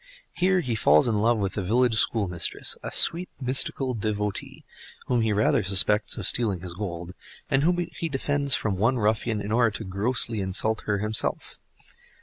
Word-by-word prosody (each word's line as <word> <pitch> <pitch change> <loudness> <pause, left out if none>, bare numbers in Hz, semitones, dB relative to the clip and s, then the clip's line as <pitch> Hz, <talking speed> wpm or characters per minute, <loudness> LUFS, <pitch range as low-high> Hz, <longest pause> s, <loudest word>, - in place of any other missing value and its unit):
Here 185 0 +2
he 125 -7 -3
falls 75 -7 +4
in 115 - +1
love 115 +1 +2
with 100 -2 -2
the 100 - -3
village 120 +5 +1
schoolmistress, 95 -7 +1
a - - -6
sweet 175 +2 +1
mystical 130 0 -1
devotee, 105 -2 -4 0.4
whom 120 -2 0
he 110 -1 0
rather 105 +2 +2
suspects 100 +2 +2
of 105 - -4
stealing 105 -5 +2
his 90 -1 -6
gold, 90 -2 -6 0.4
and 135 - +3
whom 175 +4 +2
he 165 +2 -4
defends 140 0 0
from 100 -3 -2
one 120 +6 +1
ruffian 110 0 0
in 100 +1 -5
order 120 0 +3
to - - -7
grossly 110 +3 +1
insult 100 +4 -1
her 105 -1 +1
himself. 105 +2 -2
110 Hz, 170 wpm, -25 LUFS, 100-125 Hz, 0.4 s, falls